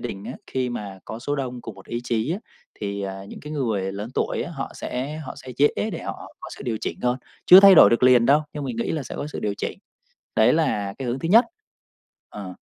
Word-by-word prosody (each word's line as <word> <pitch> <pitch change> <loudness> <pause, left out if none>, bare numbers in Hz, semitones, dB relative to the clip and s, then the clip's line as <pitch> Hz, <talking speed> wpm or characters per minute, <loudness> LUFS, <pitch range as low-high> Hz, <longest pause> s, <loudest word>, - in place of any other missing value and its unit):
đình 95 +1 -6
á, 120 - -5
khi 130 -1 -2
mà 100 -5 -6
có 110 - -7
số 145 +4 -3
đông 125 -3 -4
cùng 115 - -8
một - - -15
ý 120 - -3
chí 115 +5 0
á 185 - -2 0.4
thì, 100 -1 -3
à, 95 0 -5
những - - -10
cái 150 - -8
người 110 -10 -1
lớn 105 +4 -6
tuổi - - -1
á, 170 - -7
họ 135 - -5
sẽ 135 +5 -4
họ 150 -4 -7
sẽ 130 -2 -9
dễ 145 +1 +6 0.2
để 165 - -5
họ - - -7
có - - -8
sự - - -9
điều 115 -2 -1
chỉnh - - -4
thôi, 125 0 +1 0.3
chưa 185 +2 +11
thay 195 -1 +9
đổi - - +8
được 115 - +2
liền 125 -2 +6
đâu, 145 +4 +5
nhưng 145 -2 -5
mình 125 -4 -4
nghĩ 115 - -2
là 155 -3 -2
sẽ - - -8
có - - -4
sự 150 - -6
điều 105 -1 -1
chỉnh. - - -4 0.6
Đấy 110 +3 +5
là 105 -11 0
cái 130 - -3
hướng 120 +2 -2
thứ 165 - -3
nhất. 230 +6 +7 0.8
Ờ. 95 -3 -8
125 Hz, 255 wpm, -23 LUFS, 105-145 Hz, 0.8 s, chưa